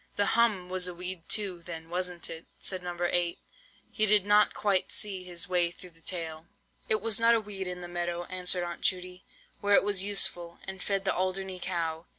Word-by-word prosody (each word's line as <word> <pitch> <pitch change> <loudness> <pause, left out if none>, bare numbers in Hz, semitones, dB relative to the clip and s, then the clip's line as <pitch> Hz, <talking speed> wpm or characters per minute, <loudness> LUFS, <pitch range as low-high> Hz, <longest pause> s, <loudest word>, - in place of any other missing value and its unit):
"'The 205 - +3
hum 220 -6 +2
was 180 0 0
a 180 - -5
weed 180 -1 -4
too, 195 -5 +2
then, 165 -1 -8
was 180 +2 -1
it?" 170 -2 -6
said 185 -2 -2
No. 175 -1 -6
8. 175 -1 +1 0.5
He 215 - +2
did 205 -2 +6
not 205 +1 +5
quite 200 -3 +2
see 195 -3 0
his 180 +1 -1
way 175 -2 +4
through 180 +1 -11
the 165 0 -22
tale. 165 -2 -4 0.4
"It 215 - +2
was 225 -2 +1
not 230 +1 +5
a - - +2
weed 200 -3 -5
in 180 0 -4
the 175 - -5
meadow," 175 0 -2
answered 180 0 0
Aunt 175 -1 -6
Judy, 180 0 -1 0.4
"where 205 0 +3
it - - +5
was 200 -2 +2
useful, 175 -4 +1
and 190 -1 -6
fed 195 -1 -1
the - - +2
Alderney 185 0 -2
cow. 165 -2 -3
180 Hz, 205 wpm, -29 LUFS, 175-195 Hz, 0.5 s, did